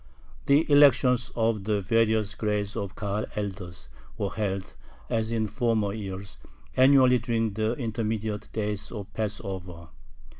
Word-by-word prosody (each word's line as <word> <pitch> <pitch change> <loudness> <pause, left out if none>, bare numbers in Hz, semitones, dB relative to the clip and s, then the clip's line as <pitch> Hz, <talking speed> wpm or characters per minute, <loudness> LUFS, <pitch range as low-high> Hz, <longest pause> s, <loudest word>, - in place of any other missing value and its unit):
The 145 +3 +5
elections 135 -3 +5
of 115 -4 0
the 105 -1 +1
various 110 0 +2
grades 105 -1 -2
of 95 -1 -4
Kahal 105 0 -2
elders 95 -6 -5 0.3
were 100 - -2
held, 100 -3 -3 0.4
as 110 -1 0
in 115 -1 0
former 110 -3 0
years, 100 -2 -7 0.4
annually 130 -1 +6
during 115 -2 -1
the 110 +2 0
intermediate 110 -3 -3
days 105 -2 -3
of 105 -4 -7
Passover. 95 -6 -5
110 Hz, 125 wpm, -27 LUFS, 100-115 Hz, 0.4 s, annually